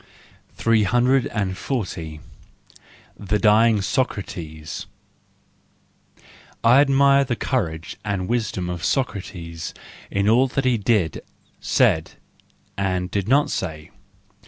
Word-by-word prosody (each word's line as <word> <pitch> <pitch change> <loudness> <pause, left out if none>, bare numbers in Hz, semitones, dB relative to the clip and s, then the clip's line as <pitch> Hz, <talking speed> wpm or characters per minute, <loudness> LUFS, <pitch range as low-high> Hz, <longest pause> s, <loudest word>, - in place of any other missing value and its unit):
340. 110 - 0 1.0
The 105 +1 0
Dying 110 0 +4
Socrates 85 - -3 1.8
.—I 125 +4 +6
admire 140 0 +4
the 125 -3 -2
courage 85 - -3
and 100 -3 -2
wisdom 110 -6 -1
of 90 -1 -5
Socrates 85 - -3 0.3
in 100 +1 0
all 120 +5 +4
that 135 +1 -2
he 125 -3 +2
did, 100 -7 +1 0.4
said—and 95 -2 -2
did 100 -1 -1
not 140 +4 +3
say. 80 -4 -4
105 Hz, 85 wpm, -22 LUFS, 90-125 Hz, 1.8 s, I